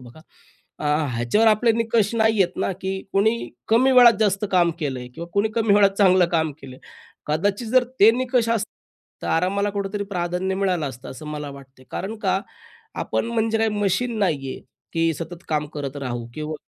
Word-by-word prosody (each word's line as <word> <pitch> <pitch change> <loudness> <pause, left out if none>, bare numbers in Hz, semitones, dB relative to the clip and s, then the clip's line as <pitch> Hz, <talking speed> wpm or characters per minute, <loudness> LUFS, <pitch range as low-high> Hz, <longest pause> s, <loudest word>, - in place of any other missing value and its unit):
बघा. 125 +5 -14 0.6
अ, - - -4 0.3
ह्याच्यावर 120 - +2
आपले 220 +2 +3
निकष 225 -1 +1
नाही 220 -1 +2
येत 185 -2 +1
ना - - -1
की 190 +1 -2 0.2
कोणी 220 +4 +1 0.2
कमी 255 +4 +4
वेळात 245 -2 +8
जास्त 205 -1 +1
काम 175 -2 +3
केलंय 130 -5 -4
किंवा 170 - -7
कोणी 200 +2 +2
कमी 220 -3 +3
वेळात 200 -1 +5
चांगलं 185 -3 +5
काम 160 -2 +1
केलं 130 -2 -10
आहे. - - -20 0.5
कदाचित 200 +9 -1
जर 255 +2 +4 0.2
ते 215 +3 +9
निकष 245 -1 0
असता 220 -2 -1 0.5
तर - - -4
आरामाला 200 +4 +1
कुठेतरी 200 0 -3
प्राधान्य 180 +1 -1
मिळालं 185 -5 0
असतं 125 -1 -10
असं 150 +4 -10
मला 150 -1 -5
वाटते. 135 -1 -14
कारण 210 +4 -4
का? 190 -2 0 0.5
आपण - - -2
म्हणजे 225 -1 0
काय 225 0 +2
मशीन 215 +3 -1
नाही 150 -9 0
आहे - - -9 0.3
की 165 0 +1
सतत 170 +2 -8
काम 150 -1 0
करत 140 -1 -5
राहू 120 -4 -4
किंवा 155 0 -4
190 Hz, 185 wpm, -22 LUFS, 155-220 Hz, 0.6 s, ते